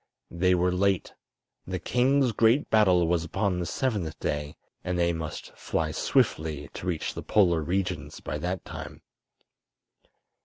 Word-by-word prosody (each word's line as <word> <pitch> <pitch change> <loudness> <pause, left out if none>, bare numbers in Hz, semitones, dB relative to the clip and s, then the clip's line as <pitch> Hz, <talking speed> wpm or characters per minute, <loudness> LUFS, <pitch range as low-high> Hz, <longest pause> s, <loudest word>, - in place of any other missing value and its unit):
They 90 +2 +2
were 90 +1 +2
late. 95 0 +1 0.5
The - - -2
king's 130 +1 +2
great 115 +6 +3
battle 95 -6 +4
was 85 -1 +1
upon 95 +2 -1
the 85 - -2
seventh 105 - -2
day, 75 0 -3 0.3
and 90 0 -2
they 85 0 +2
must 80 -2 -6
fly 80 -1 -2
swiftly 75 -2 0
to 90 - -7
reach 85 -4 -2
the - - -6
Polar 85 -6 +3
regions 90 -3 -2
by 75 - -4
that 90 +4 -3
time. - - -8
90 Hz, 145 wpm, -27 LUFS, 80-100 Hz, 0.5 s, battle